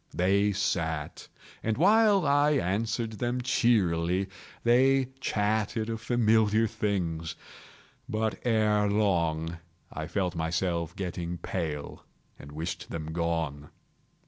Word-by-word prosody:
They 100 +3 +3
sat, 80 -6 -2 0.3
and 110 -1 -1
while 205 +1 +5
I 145 +1 +4
answered 110 -1 -1 0.2
cheerily, 95 -6 +2 0.3
they 130 +2 +4
chatted 110 0 0
of 115 -1 -4
familiar 110 -1 +3
things. 85 -6 -2 0.7
But, 110 0 -1
ere 105 -3 +2
long, 85 -5 0 0.3
I 80 0 -4
felt 90 0 -1
myself 85 0 -1
getting 90 -2 -4
pale 80 -4 -4 0.4
and 70 - -11
wished 80 +3 -5
them 80 -1 -5
gone. 80 -4 -2
100 Hz, 100 wpm, -28 LUFS, 85-110 Hz, 0.7 s, while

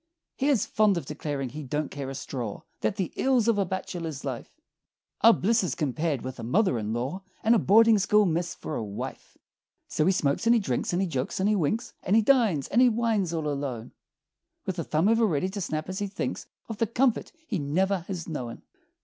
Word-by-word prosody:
He 275 - 0
is 255 -8 +3
fond 210 -3 +2
of 170 - -4
declaring 145 -2 -4
he 150 +5 -7
"don't 150 +2 -3
care 140 -2 -5
a 135 - -6
straw" 120 -6 -5 0.2
That 205 - 0
"the 190 -4 -3
ills 255 -4 +2
of 225 -3 +3
a 195 - +2
bachelor's 170 -5 -5
life 130 -4 -6 0.6
Are 230 - +8
blisses 220 -3 +1
compared 150 -1 -1
with 130 0 -6
a - - -6
mother 160 - +2
in 105 0 -3
law, 130 +11 -3 0.2
And 225 - +5
a 230 - +5
boarding 225 +2 +5
school 210 +2 +4
miss 170 0 -1
for - - -6
a 115 - -2
wife!" 100 -1 -7 0.5
So 155 - 0
he - - +5
smokes, 160 +3 0
and 235 - +6
he - - +4
drinks, 130 - -1
and 180 +2 +1
he - - -1
jokes 135 -1 -3
and 190 - +2
he 215 - +3
winks, 200 +5 -1
And 195 - +1
he 225 - +5
dines, 215 - +3
and 240 - +3
he 255 - +7
wines 220 -6 0
all 160 -2 -2
alone, 140 -5 -4 0.7
With 185 -2 -3
a - - -1
thumb 155 +5 +1
ever 225 0 +4
ready 175 +1 0
to 200 +1 -5
snap 155 -3 -3
as 185 +1 -4
he 205 - -1
thinks 195 +1 -4 0.2
Of 225 -2 -6
the 230 - +2
comforts 245 +1 +1
he 215 - -2
never 185 +7 +1
has 180 -5 -5
known. 125 -8 -5
180 Hz, 220 wpm, -27 LUFS, 145-215 Hz, 0.7 s, Are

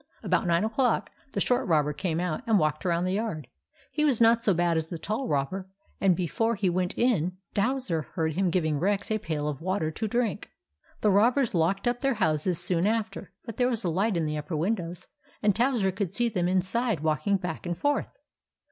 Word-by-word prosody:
About - - +1
nine 170 +2 +3
o'clock, 230 +2 +1 0.2
the - - -1
short 250 +1 +1
robber 150 -3 +2
came 165 0 -2
out 180 +1 -2
and 220 -2 +4
walked 155 +1 0
around 170 0 +1
the 185 - 0
yard. 200 - -2 0.5
He 300 - 0
was 280 -6 +2
not 230 0 +5
so 210 - +4
bad 175 -1 +2
as 160 -1 -1
the 170 - -5
tall 215 +10 -3
robber 185 +6 -1 0.3
and, 190 -3 +4
before 225 +6 0
he 195 -3 +1
went 180 0 -1
in, 185 -8 +1 0.2
Towser 210 -6 0
heard 160 -2 0
him 185 +2 +1
giving 160 -4 0
Rex 200 +4 0
a 215 - +1
pail 155 -5 -3
of 150 0 -4
water 180 -3 -1
to 220 +8 -3
drink. 235 -1 -1 0.5
The 210 - +4
robbers 235 +5 +3
locked 190 +5 +1
up 240 0 +1
their 270 -1 +1
house 155 -6 +1
soon 175 +3 +2
after; 215 -4 -2 0.2
but 230 -3 -7
there 250 0 +3
was 235 -3 -2
a 175 - 0
light 190 +4 +1
in 165 - 0
the 150 0 -2
upper 155 +2 -4
windows, 175 0 -2 0.4
and 205 -2 +3
Towser 235 -5 +2
could 195 -1 -3
see 240 -1 +2
them 180 -5 0
inside 190 - 0
walking 155 +5 +1
back 180 -2 -5
and 175 -1 -2
forth. 290 0 0
190 Hz, 210 wpm, -27 LUFS, 165-225 Hz, 0.5 s, not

